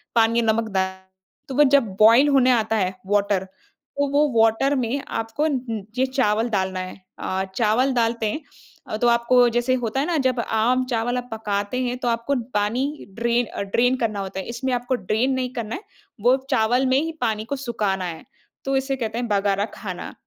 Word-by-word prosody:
पानी 230 Hz, +1 st, +4 dB
नमक 225 Hz, 0 st, +1 dB
द 190 Hz, -, +3 dB, 0.6 s
तो 265 Hz, -, -4 dB
वो 295 Hz, -, +6 dB
जब 280 Hz, -1 st, +5 dB, 0.2 s
बॉयल 230 Hz, +7 st, +7 dB
होने 260 Hz, -2 st, +4 dB
आता 225 Hz, -2 st, +1 dB
है 185 Hz, -2 st, 0 dB
वाटर, 200 Hz, -1 st, +1 dB
तो 280 Hz, +8 st, -6 dB
वो 295 Hz, +1 st, +4 dB, 0.2 s
वाटर 225 Hz, +6 st, +2 dB
में 255 Hz, +1 st, -1 dB
आपको 225 Hz, +6 st, -3 dB
उं 250 Hz, -7 st, -2 dB, 0.2 s
ये 260 Hz, -, +3 dB
चावल 235 Hz, -3 st, +1 dB
डालना 190 Hz, -3 st, -1 dB
है। 185 Hz, 0 st, -6 dB, 0.2 s
अ, 190 Hz, 0 st, -2 dB
चावल 245 Hz, +4 st, +2 dB
डालते 230 Hz, -2 st, 0 dB
हैं 310 Hz, -, -4 dB, 0.5 s
अ, 215 Hz, -, -3 dB
तो 240 Hz, -, +2 dB
आपको 235 Hz, +1 st, +4 dB
जैसे 240 Hz, +2 st, +1 dB
होता 230 Hz, +4 st, -1 dB
है 285 Hz, -, +1 dB
ना 345 Hz, -2 st, +1 dB
जब 255 Hz, -2 st, -1 dB
आम 235 Hz, +3 st, +1 dB
चावल 235 Hz, +2 st, 0 dB
आप 250 Hz, 0 st, -5 dB
पकाते 210 Hz, +1 st, -2 dB
हैं 245 Hz, 0 st, -2 dB
तो 245 Hz, -, -3 dB
आपको 235 Hz, +4 st, 0 dB, 0.2 s
पानी 250 Hz, +9 st, -1 dB
ड्रेन 235 Hz, +1 st, +2 dB
अ, -, -, -6 dB
ड्रेन 240 Hz, +6 st, +2 dB
करना 215 Hz, -4 st, -1 dB
होता 190 Hz, 0 st, -5 dB
है, -, -, -5 dB
इसमें 245 Hz, +2 st, -2 dB
आपको 245 Hz, +1 st, 0 dB
ड्रेन 225 Hz, +4 st, 0 dB
नहीं 255 Hz, -1 st, -2 dB
करना 230 Hz, -2 st, -4 dB
है -, -, -7 dB, 0.4 s
वो 250 Hz, +1 st, +5 dB, 0.2 s
चावल 240 Hz, +4 st, +2 dB
में 260 Hz, +1 st, +3 dB
ही 325 Hz, +1 st, -2 dB
पानी 220 Hz, -2 st, -1 dB
को 280 Hz, +5 st, -3 dB
सुखाना 210 Hz, -8 st, -2 dB
है, 165 Hz, -2 st, -6 dB, 0.4 s
तो 270 Hz, 0 st, 0 dB
इसे 270 Hz, +1 st, -1 dB
कहते 225 Hz, -2 st, -3 dB
हैं 240 Hz, 0 st, -2 dB
बगारा 200 Hz, -1 st, +1 dB
खाना, 185 Hz, -4 st, -6 dB
235 Hz, 200 wpm, -23 LUFS, 215-255 Hz, 0.6 s, बॉयल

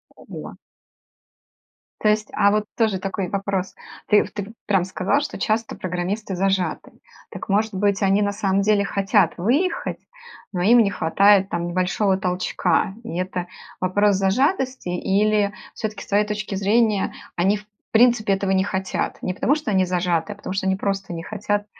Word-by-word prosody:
Ого. -, -, -9 dB, 1.5 s
То 215 Hz, -, +3 dB
есть 210 Hz, 0 st, +1 dB
а 200 Hz, -, +4 dB
вот 210 Hz, 0 st, +1 dB
тоже 215 Hz, -5 st, +1 dB
такой 195 Hz, -1 st, -3 dB
вопрос: 195 Hz, -1 st, -2 dB, 0.3 s
ты 210 Hz, -, +5 dB
в -, -, -10 dB
ты 205 Hz, -1 st, -4 dB
вот 220 Hz, -, -12 dB
прям 195 Hz, -3 st, +2 dB
сказал, 185 Hz, +8 st, 0 dB
что 295 Hz, -, -5 dB
часто 220 Hz, +1 st, -1 dB
программисты 185 Hz, +3 st, -3 dB
зажаты. 190 Hz, 0 st, -1 dB, 0.4 s
Так, -, -, -8 dB
может 215 Hz, +2 st, +1 dB
быть, 200 Hz, +1 st, +1 dB
они 195 Hz, +1 st, +3 dB
на 205 Hz, 0 st, +1 dB
самом 200 Hz, -1 st, +1 dB
деле 205 Hz, 0 st, +3 dB
хотят 195 Hz, 0 st, +2 dB
выехать, 275 Hz, -, 0 dB, 0.5 s
но 180 Hz, -2 st, -2 dB
им 235 Hz, +6 st, +6 dB
не 205 Hz, -4 st, +3 dB
хватает 195 Hz, +3 st, +4 dB
там 170 Hz, 0 st, -2 dB
небольшого 185 Hz, +2 st, +1 dB
толчка. 180 Hz, 0 st, 0 dB
И 230 Hz, -, -6 dB
это 180 Hz, -1 st, -3 dB, 0.3 s
вопрос 200 Hz, +2 st, +2 dB
зажатости, 255 Hz, -, 0 dB
или 205 Hz, +3 st, +1 dB, 0.2 s
всё-таки, 215 Hz, -2 st, -5 dB
с -, -, -16 dB
твоей 205 Hz, +1 st, +2 dB
точки 210 Hz, -1 st, -4 dB
зрения, 210 Hz, +1 st, +2 dB, 0.2 s
они, 195 Hz, +4 st, +2 dB
в 205 Hz, -, -14 dB, 0.3 s
принципе, 230 Hz, -3 st, +4 dB
этого 195 Hz, 0 st, -1 dB
не 190 Hz, 0 st, +3 dB
хотят? 190 Hz, -1 st, -3 dB
Не 185 Hz, -, -2 dB
потому 265 Hz, +9 st, +2 dB
что 300 Hz, -8 st, -3 dB
они 190 Hz, -2 st, +3 dB
зажаты, 180 Hz, +1 st, 0 dB
а -, -, -17 dB
потому 200 Hz, -2 st, -6 dB
что 190 Hz, 0 st, -1 dB
они 190 Hz, -, +2 dB
просто 195 Hz, -1 st, -3 dB
не 165 Hz, -1 st, -5 dB
хотят 205 Hz, 0 st, -2 dB
200 Hz, 170 wpm, -22 LUFS, 190-210 Hz, 1.5 s, им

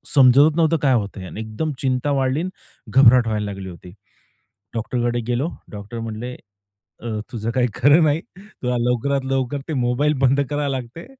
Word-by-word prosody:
समजतच 140 Hz, +4 st, +6 dB
नव्हतं 165 Hz, 0 st, +3 dB
काय 135 Hz, -3 st, +3 dB
होतंय 100 Hz, -4 st, -2 dB
आणि 105 Hz, -, -8 dB
एकदम 110 Hz, +8 st, -3 dB
चिंता 130 Hz, +1 st, 0 dB
वाढली 135 Hz, +2 st, +1 dB
अन् 185 Hz, -, -3 dB, 0.4 s
घबराट 125 Hz, -2 st, +6 dB
व्हायला 105 Hz, -1 st, -1 dB
लागली 95 Hz, -1 st, -7 dB
होती. 90 Hz, +1 st, -12 dB, 0.8 s
डॉक्टरकडे 120 Hz, +1 st, -1 dB
गेलो, 125 Hz, +6 st, 0 dB, 0.2 s
डॉक्टर 105 Hz, +3 st, -7 dB
म्हणले, 115 Hz, +2 st, -5 dB, 0.7 s
"अ, 120 Hz, -, -6 dB, 0.2 s
तुझं 115 Hz, -1 st, -4 dB
काही 125 Hz, -1 st, +3 dB
खरं 145 Hz, +6 st, +5 dB
नाही, 155 Hz, +2 st, +2 dB, 0.2 s
तुला 130 Hz, -12 st, -5 dB
लवकरात 125 Hz, +3 st, 0 dB
लवकर 135 Hz, +1 st, -1 dB
ते 160 Hz, -, -3 dB
मोबाईल 125 Hz, +5 st, +1 dB
बंद 135 Hz, +2 st, +3 dB
लागते. 140 Hz, 0 st, -3 dB
125 Hz, 155 wpm, -21 LUFS, 115-145 Hz, 0.8 s, समजतच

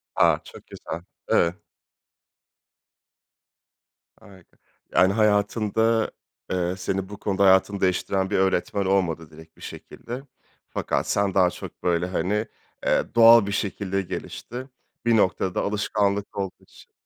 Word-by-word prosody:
A! -, -, +4 dB
Çok -, -, -14 dB
güzel. 85 Hz, -, -7 dB, 0.3 s
Evet. 85 Hz, +1 st, +3 dB, 2.6 s
Harika. 100 Hz, -5 st, -19 dB, 0.4 s
Yani, 95 Hz, +1 st, +5 dB
hayatında, 110 Hz, +1 st, +2 dB, 0.4 s
eee, 90 Hz, 0 st, 0 dB
seni 95 Hz, +1 st, -3 dB
bu 105 Hz, -, -8 dB
konuda 100 Hz, -1 st, 0 dB
hayatını 95 Hz, +1 st, +4 dB
değiştiren 95 Hz, +1 st, +1 dB
bir -, -, +1 dB
öğretmen 95 Hz, +1 st, +1 dB
olmadı 90 Hz, -5 st, 0 dB
direkt 80 Hz, +1 st, -15 dB
bir -, -, -19 dB
şekilde. 125 Hz, +3 st, -8 dB, 0.5 s
Fakat -, -, -2 dB
sen 100 Hz, -1 st, +1 dB
daha 90 Hz, -2 st, +4 dB
çok, -, -, -10 dB
böyle, 85 Hz, -1 st, +1 dB
hani, 100 Hz, +5 st, -1 dB, 0.4 s
eee, -, -, +3 dB
doğal 115 Hz, -1 st, +8 dB
bir 100 Hz, -, -3 dB
şekilde 100 Hz, -1 st, -2 dB
gelişti. 125 Hz, +7 st, -7 dB, 0.4 s
Bir 115 Hz, -1 st, +4 dB
noktada 95 Hz, -2 st, +1 dB
alışkanlık 100 Hz, -1 st, -1 dB
olduğu 95 Hz, -2 st, -4 dB
için, -, -, -19 dB
100 Hz, 125 wpm, -24 LUFS, 95-105 Hz, 2.6 s, doğal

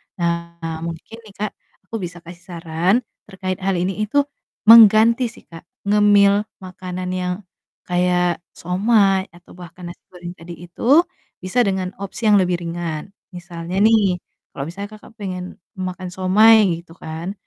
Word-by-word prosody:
Nah, 170 Hz, -2 st, -3 dB
mungkin 170 Hz, +7 st, -7 dB
nih 200 Hz, -, -15 dB
Kak, 210 Hz, -, -2 dB, 0.3 s
aku 225 Hz, +2 st, -5 dB
bisa 175 Hz, -1 st, -7 dB
kasih 170 Hz, +1 st, -12 dB
saran 170 Hz, +4 st, 0 dB, 0.3 s
terkait 185 Hz, -2 st, -5 dB
hal 195 Hz, 0 st, 0 dB
ini 190 Hz, +4 st, -1 dB
itu 285 Hz, +7 st, +2 dB, 0.5 s
mengganti 225 Hz, +2 st, +8 dB
sih -, -, -17 dB
Kak, 165 Hz, 0 st, -13 dB, 0.2 s
ngemil 205 Hz, 0 st, +4 dB, 0.2 s
makanan 185 Hz, 0 st, -6 dB
yang 180 Hz, -1 st, -2 dB, 0.5 s
kayak 180 Hz, -1 st, +1 dB, 0.2 s
siomay 195 Hz, +1 st, +2 dB
atau 175 Hz, +1 st, -18 dB
bahkan 175 Hz, 0 st, -11 dB
nasi -, -, -16 dB
goreng 175 Hz, -1 st, -9 dB
tadi 170 Hz, 0 st, -11 dB
itu 270 Hz, -, +3 dB, 0.4 s
bisa 185 Hz, +7 st, +1 dB
dengan 190 Hz, -3 st, -1 dB
opsi 200 Hz, +4 st, -5 dB
yang 205 Hz, -, +6 dB
lebih 180 Hz, -1 st, 0 dB
ringan. 170 Hz, +1 st, -5 dB, 0.2 s
Misalnya 175 Hz, 0 st, -6 dB
nih, 205 Hz, -5 st, +3 dB, 0.4 s
kalau 140 Hz, -, -4 dB
misalnya 200 Hz, +4 st, -7 dB
Kakak 215 Hz, -, -17 dB
pengen 185 Hz, -2 st, -6 dB, 0.2 s
makan 185 Hz, 0 st, -5 dB
siomay 210 Hz, +4 st, +5 dB, 0.2 s
gitu 165 Hz, -1 st, -17 dB
kan, 160 Hz, +4 st, -6 dB
185 Hz, 145 wpm, -20 LUFS, 175-205 Hz, 0.5 s, mengganti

